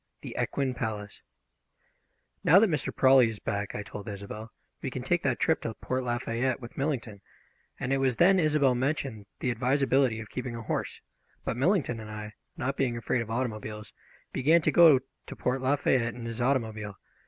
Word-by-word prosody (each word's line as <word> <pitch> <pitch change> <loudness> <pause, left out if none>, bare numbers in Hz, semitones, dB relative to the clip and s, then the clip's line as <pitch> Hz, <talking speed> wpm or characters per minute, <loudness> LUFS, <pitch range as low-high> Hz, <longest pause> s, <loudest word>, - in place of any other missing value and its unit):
THE - - -8
EQUINE 135 -2 -1
PALACE 105 -4 -5 1.2
"NOW 170 - +7
that 205 -1 +5
Mr. 150 -3 -1
Prawley 130 -3 +5
is 110 - -6
back," 100 0 -3
I 105 - -3
told 105 0 -8
Isobel, 105 +2 -7 0.3
"we - - -2
can - - -5
take - - +1
that - - 0
trip - - +2
to 115 - -4
Port 130 0 -2
Lafayette 120 +1 -1
with 120 -2 -10
Millington," 125 -8 -3 0.6
and 125 +2 -1
it 135 - +2
was 130 -2 +2
then 185 +8 +5
Isobel 150 -5 +3
mentioned 130 -5 -2
the 125 - +1
advisability 130 0 +2
of 110 - -9
keeping 125 -2 -4
a 115 - -6
horse; - - -3 0.4
but - - -1
Millington 135 - +1
and 110 -1 -8
I, 105 0 -7 0.2
not 135 +2 -2
being 120 -3 0
afraid 120 +1 0
of 115 - -6
automobiles, 110 -3 -4 0.4
began 155 +5 +4
to 155 - +3
go 155 -5 +7 0.3
to - - -7
Port 130 +1 -1
Lafayette 130 -3 +1
in 120 -1 -7
his 115 +1 -4
automobile. 110 -6 -1
125 Hz, 180 wpm, -28 LUFS, 110-135 Hz, 1.2 s, NOW